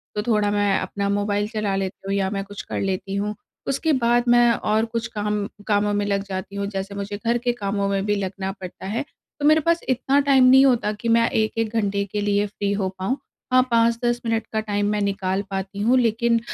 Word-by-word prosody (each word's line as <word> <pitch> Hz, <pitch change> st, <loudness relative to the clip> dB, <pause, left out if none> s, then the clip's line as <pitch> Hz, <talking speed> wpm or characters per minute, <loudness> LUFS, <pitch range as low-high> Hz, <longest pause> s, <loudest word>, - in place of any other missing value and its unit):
तो 210 Hz, -, 0 dB
थोड़ा 210 Hz, -3 st, +2 dB
मैं 205 Hz, -1 st, +2 dB
अपना 200 Hz, +2 st, -3 dB
मोबाइल 205 Hz, 0 st, 0 dB
चला 215 Hz, -3 st, -1 dB
लेती 195 Hz, 0 st, -4 dB
हूँ 195 Hz, -, -1 dB
या 195 Hz, -1 st, +1 dB
मैं 195 Hz, 0 st, -3 dB
कुछ 205 Hz, 0 st, -8 dB
कर -, -, -5 dB
लेती 195 Hz, 0 st, -2 dB
हूँ। 210 Hz, +1 st, -2 dB, 0.3 s
उसके 290 Hz, +4 st, +1 dB
बाद 240 Hz, +1 st, +3 dB
मैं 240 Hz, 0 st, +6 dB
और 215 Hz, +1 st, +1 dB
कुछ 230 Hz, 0 st, -3 dB
काम 210 Hz, -1 st, -1 dB, 0.2 s
कामों 205 Hz, -1 st, +2 dB
में 205 Hz, 0 st, 0 dB
लग 200 Hz, -1 st, 0 dB
जाती 195 Hz, 0 st, -6 dB
हूँ 200 Hz, 0 st, -2 dB
जैसे 195 Hz, 0 st, -5 dB
मुझे 200 Hz, 0 st, -4 dB
घर 235 Hz, +3 st, 0 dB
के 240 Hz, +1 st, 0 dB
कामों 200 Hz, -2 st, -2 dB
में 195 Hz, 0 st, 0 dB
भी 205 Hz, 0 st, +1 dB
लगना 195 Hz, 0 st, -3 dB
पड़ता 190 Hz, -2 st, -9 dB
है। 230 Hz, +7 st, -2 dB, 0.4 s
तो 290 Hz, -, -1 dB
मेरे 310 Hz, +1 st, +5 dB
पास 335 Hz, +2 st, +2 dB
इतना 265 Hz, +2 st, +2 dB
टाइम 275 Hz, -2 st, +4 dB
नहीं 265 Hz, +2 st, +7 dB
होता 240 Hz, -5 st, +2 dB
कि 220 Hz, +2 st, -4 dB
मैं 230 Hz, 0 st, +4 dB
1-1 220 Hz, 0 st, -1 dB
घंटे 200 Hz, -2 st, 0 dB
के 210 Hz, -, -1 dB
लिए 205 Hz, 0 st, +1 dB
फ़्री 200 Hz, 0 st, -3 dB
हो 195 Hz, -2 st, -1 dB
पाऊँ, 240 Hz, +9 st, -1 dB, 0.4 s
हाँ 255 Hz, -, +7 dB
5-10 235 Hz, +1 st, +2 dB
मिनट 225 Hz, -1 st, 0 dB
का 220 Hz, -, +1 dB
टाइम 205 Hz, -1 st, -1 dB
निकाल 195 Hz, -2 st, -1 dB
पाती 195 Hz, +1 st, -4 dB
हूँ, 245 Hz, +4 st, +4 dB
लेकिन 235 Hz, 0 st, +2 dB
205 Hz, 220 wpm, -23 LUFS, 200-235 Hz, 0.4 s, नहीं